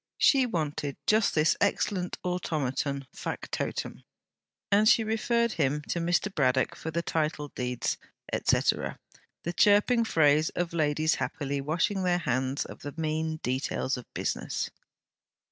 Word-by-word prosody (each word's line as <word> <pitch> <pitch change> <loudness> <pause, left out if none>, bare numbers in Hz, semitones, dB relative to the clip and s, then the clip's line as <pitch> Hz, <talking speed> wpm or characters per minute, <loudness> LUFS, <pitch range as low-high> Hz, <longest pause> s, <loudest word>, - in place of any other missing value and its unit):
She 265 -3 +5
wanted 150 - -2
just 215 0 +3
this 155 +1 +4
excellent 195 -2 0
automaton 140 -6 -1
fac - - -5
totum; - - -3 0.7
and 210 +2 +5
she 225 - +5
referred 235 +1 +1
him 150 -4 0
to 170 - 0
Mr. 175 +4 +1
Braddock 130 -4 +2
for 160 - -6
the 170 +1 -2
title 150 -3 -1
deeds, 125 -2 -2 0.3
et - - -2
caetera - - +2 0.5
the 170 - -3
chirping 210 +6 +4
phrase 155 -6 +3
of 175 -1 -1
ladies 155 -1 +2
happily 140 -1 -2
washing 170 +7 0
their 180 -1 +2
hands 130 -3 -1
of - - -10
the 145 - -7
mean 160 0 -1
details 130 +1 -1
of 125 - -10
business. - - -2
160 Hz, 140 wpm, -28 LUFS, 145-185 Hz, 0.7 s, She